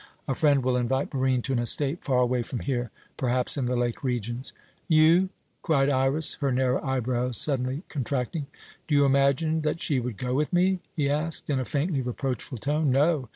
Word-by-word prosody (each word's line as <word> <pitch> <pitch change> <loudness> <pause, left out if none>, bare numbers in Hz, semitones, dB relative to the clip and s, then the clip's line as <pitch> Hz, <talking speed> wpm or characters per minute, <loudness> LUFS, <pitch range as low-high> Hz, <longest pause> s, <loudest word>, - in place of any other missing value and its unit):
A 135 - 0
friend 140 -1 +2
will 125 0 +1
invite 130 +3 -1
Barine 130 -2 +1
to 135 - -1
an 120 - +1
estate 140 +6 0
far 125 -2 +2
away 125 0 +1
from 120 +1 -5
here, 125 -3 -2 0.3
perhaps 125 -1 +1
in 135 -4 -1
the 125 - 0
lake 120 +1 -2
regions." 120 0 -3 0.4
"You?" 165 +4 +5 0.3
cried 140 -4 +2
Iras, 135 +3 +1
her 140 -1 +1
narrow 130 +1 +1
eyebrows 125 -2 -1
suddenly 135 +1 0
contracting. 140 +2 -3 0.4
"Do 150 - +1
you 145 0 +5
imagine 140 +4 +2
that 155 +2 -1
she 145 -5 0
would 120 -4 -4
go 125 0 -2
with 150 +3 0
me?" 185 +1 +2 0.2
he 145 -4 +1
asked, 150 +2 -1
in 135 - +1
a 130 - -2
faintly 145 +1 -1
reproachful 125 0 -4
tone. 145 +6 0
"No. 140 -1 +2
135 Hz, 190 wpm, -26 LUFS, 125-150 Hz, 0.4 s, You